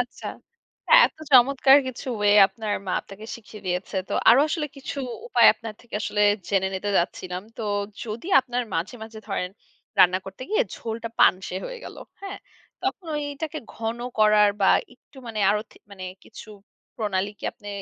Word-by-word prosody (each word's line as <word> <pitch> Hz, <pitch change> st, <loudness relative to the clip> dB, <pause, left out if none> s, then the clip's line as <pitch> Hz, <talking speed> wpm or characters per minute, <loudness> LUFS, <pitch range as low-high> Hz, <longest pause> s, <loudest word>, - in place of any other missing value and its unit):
আচ্ছা। 245 Hz, 0 st, -5 dB, 0.6 s
আ -, -, +4 dB
এত -, -, -13 dB, 0.2 s
চমৎকার 265 Hz, +2 st, +7 dB
কিছু 260 Hz, +1 st, -6 dB
way 205 Hz, 0 st, +5 dB
আপনার 215 Hz, -1 st, -5 dB
মা 180 Hz, -, -2 dB
আপনাকে 200 Hz, +2 st, -12 dB
শিখিয়ে 215 Hz, -3 st, -12 dB
দিয়েছে। 180 Hz, +2 st, -3 dB
তো -, -, -5 dB, 0.2 s
আরো 240 Hz, +4 st, +8 dB
আসলে 310 Hz, -1 st, -1 dB
কিছু 275 Hz, +1 st, -6 dB, 0.3 s
উপায় 480 Hz, -, +5 dB
আপনার 225 Hz, -2 st, -8 dB
থেকে 240 Hz, -, -13 dB
আসলে 210 Hz, -2 st, -1 dB, 0.3 s
জেনে 190 Hz, -1 st, +1 dB
নিতে 205 Hz, +2 st, -2 dB
চাচ্ছিলাম। 180 Hz, +1 st, -2 dB
তো -, -, -5 dB, 0.4 s
যদি 230 Hz, +5 st, -6 dB
আপনার 250 Hz, -1 st, -3 dB
মাঝে, 165 Hz, +8 st, -2 dB
মাঝে 220 Hz, 0 st, -9 dB
ধরেন 180 Hz, -2 st, -2 dB, 0.5 s
রান্না 185 Hz, 0 st, +6 dB
করতে 195 Hz, +6 st, -9 dB
গিয়ে 430 Hz, -, +3 dB
ঝোলটা 230 Hz, 0 st, -5 dB
পানসে 185 Hz, 0 st, +3 dB
হয়ে -, -, -6 dB
গেল। -, -, -9 dB, 0.2 s
হ্যাঁ? 395 Hz, 0 st, -7 dB, 0.4 s
তখন 365 Hz, -, -3 dB
ওইটাকে 295 Hz, +2 st, -4 dB, 0.2 s
ঘন 225 Hz, +1 st, -3 dB, 0.2 s
করার 210 Hz, -1 st, +5 dB
বা -, -, +4 dB, 0.3 s
একটু -, -, -27 dB
মানে 220 Hz, -2 st, -4 dB
আরো 210 Hz, +1 st, +1 dB
থি -, -, -20 dB, 0.5 s
কিছু -, -, -12 dB, 0.5 s
প্রণালী 205 Hz, -3 st, -1 dB
কি -, -, -11 dB
আপনি 205 Hz, -, -12 dB
220 Hz, 165 wpm, -24 LUFS, 195-255 Hz, 0.6 s, আরো